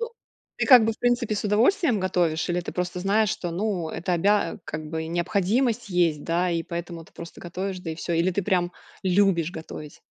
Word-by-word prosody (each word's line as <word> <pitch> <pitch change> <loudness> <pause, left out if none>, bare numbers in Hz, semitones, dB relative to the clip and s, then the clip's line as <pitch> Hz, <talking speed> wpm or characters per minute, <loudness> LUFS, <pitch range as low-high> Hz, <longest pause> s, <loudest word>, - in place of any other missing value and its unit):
Ну, 465 0 -3 0.5
ты, - - 0
как 250 -5 +9
бы, 225 - +1
в - - -15
принципе, 240 -3 +1
с 205 - -3
удовольствием 235 - +3
готовишь 175 -4 0
или 175 0 0
ты - - -6
просто 180 0 -3
знаешь, 205 +3 +2
что 175 - -3
ну 180 -2 -2
это 180 +1 -3
обя 200 0 +2
а, - - -9
как 155 0 -6
бы 160 0 -3
и - - -6
необходимость 215 +7 0
есть, 170 -4 +1
да, 175 +2 +1
и 165 -1 0
поэтому 170 -1 -6
ты - - -22
просто 170 0 -10
готовишь, 185 +2 -4
да, 165 - -5
и - - -4
всё. 170 +1 -3
Или 170 +3 +2
ты 200 +2 -1
прям 180 -2 +1 0.3
любишь 185 -3 +2
готовить? 155 -2 -9
180 Hz, 220 wpm, -25 LUFS, 170-210 Hz, 0.5 s, как